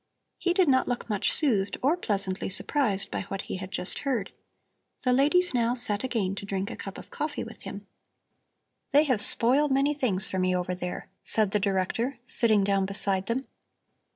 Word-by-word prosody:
He 355 -1 +1
did 370 -3 +4
not 260 -2 +3
look 245 -1 -3
much 205 - +1
soothed 210 -10 +1
or 290 +6 +4
pleasantly 200 - -2
surprised 205 0 +1
by - - -2
what 195 0 -4
he - - -5
had 185 0 -7
just 185 -1 0
heard. 250 -8 -2 0.7
The 250 -2 +3
ladies 300 +7 +3
now 240 0 +1
sat 210 -4 0
down 260 - -2
again 200 -6 -1
to 200 - -5
drink 195 0 -2
a - - -5
cup 195 - -8
of - - -12
coffee 300 0 -3
with - - -11
him. - - -8 1.0
"They 290 +2 +5
have 255 -8 +3
spoiled 260 +7 +3
many 275 +2 +3
things 225 -10 0
for 190 - -3
me 185 0 +1
over 180 0 -1
there," 180 0 -5
said 215 -3 +3
the 210 - +1
Director, 205 +6 -1
sitting 220 -5 +2
down 195 -1 +1
beside 195 -1 +1
them. 255 +3 -1
215 Hz, 190 wpm, -27 LUFS, 195-265 Hz, 1.0 s, They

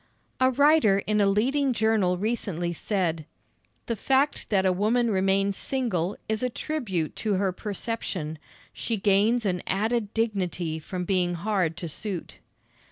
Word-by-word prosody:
A 260 0 +5
writer 285 -6 +4
in 210 0 +2
a 200 - +4
leading 260 +7 +2
journal 215 -5 +2
recently 190 -5 -2
said: 165 -4 -2 0.6
"The 230 - -2
fact 270 +6 +1
that 190 -3 +2
a 185 - +4
woman 225 +5 +2
remains 195 0 +1
single 210 -9 -1
is 220 0 -1
a 250 - +1
tribute 230 - -3
to 215 -3 0
her 190 0 +1
perception. 185 -6 -4 0.3
She 230 - -2
gains 210 +4 +3
an 180 -3 0
added 215 +2 0
dignity 180 -7 -1
from 180 +3 -5
being 180 -2 +1
hard 175 -3 0
to 175 - -5
suit." 180 +2 -5
200 Hz, 145 wpm, -26 LUFS, 180-230 Hz, 0.6 s, A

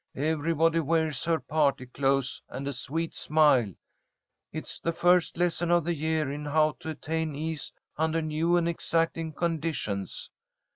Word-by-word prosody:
Everybody 160 +2 +2
wears 160 -3 0
her 165 -1 +2
party 145 -4 +1
clothes 135 +1 0
and 140 +1 -5
a 140 - -2
sweet 160 +6 -3
smile. 150 -9 +3 0.8
It's - - -7
the 165 - -1
first 175 0 +3
lesson 175 0 0
of 175 -1 +4
the 170 +2 0
year 155 -2 0
in 145 +1 -5
How 155 +1 +3
to 160 - -6
attain 160 0 -2
Ease 155 -1 -4 0.3
under 160 +1 +1
New 160 +2 +1
and 170 -1 +1
Exacting 165 -1 0
Conditions. 155 - -3
160 Hz, 145 wpm, -28 LUFS, 145-165 Hz, 0.8 s, of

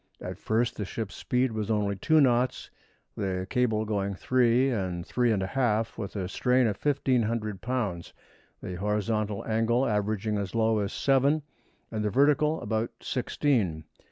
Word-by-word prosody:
At - - -7
first 115 +2 0
the 105 - -2
ship's 105 +1 -5
speed 125 0 0
was 110 -1 -3
only 105 -2 +1
two 155 - +3
knots, 125 -1 +1 0.4
the 95 -3 -2
cable 115 -4 +1
going 100 -2 -1
three 125 +4 +2
and 90 -6 -2
three 120 +1 +1
and 100 -3 +1
a 95 - -5
half 115 -4 +1
with 105 -3 -6
a 95 -3 -2
strain 125 +6 +2
of 105 -3 -2
1,500 115 -8 0
lbs., 105 -9 -2 0.5
the 90 - -5
horizontal 105 +1 -1
angle 115 +3 +1
averaging 105 -1 0
as 100 +2 -4
low 110 -1 +2
as 100 0 -2
seven 140 +3 +2 0.5
and 110 -1 -2
the 105 - +1
vertical 150 +6 +3
about 110 +2 -1
sixteen. 115 - 0
110 Hz, 155 wpm, -28 LUFS, 100-125 Hz, 0.5 s, two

